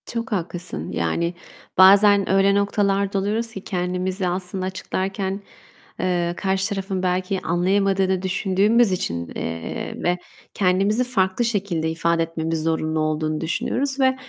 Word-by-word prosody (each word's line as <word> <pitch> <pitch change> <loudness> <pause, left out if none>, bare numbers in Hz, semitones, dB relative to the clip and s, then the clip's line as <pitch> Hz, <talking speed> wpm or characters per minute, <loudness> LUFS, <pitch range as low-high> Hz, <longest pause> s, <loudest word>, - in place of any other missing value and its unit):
Çok 235 +2 -4
haklısın. 175 - -4
Yani, 125 - -1 0.4
bazen 200 +1 +7
öyle 195 +1 +4
noktalarda 200 -1 +1
oluyoruz 215 +4 -1
ki, 195 -3 -8
kendimizi 180 +1 -2
aslında 185 +1 -2
açıklarken, 190 +1 -3 0.6
eee, 175 -1 0
karşı 190 +1 0
tarafın 195 -2 -3
belki 185 +1 0
anlayamadığı 190 +2 +1
da 190 -1 0
düşündüğümüz 195 +4 +2
için, 85 - -2
eee, 80 0 -4
ve 175 +1 +1 0.4
kendimizi 195 +5 +2
farklı 210 -2 +1
şekilde 195 -8 -1
ifade 165 +1 +1
etmemiz 165 -1 -3
zorunlu 160 -1 0
olduğunu 155 0 -1
düşünüyoruz 270 - -1
ve 260 -1 +3
190 Hz, 125 wpm, -22 LUFS, 170-200 Hz, 0.6 s, bazen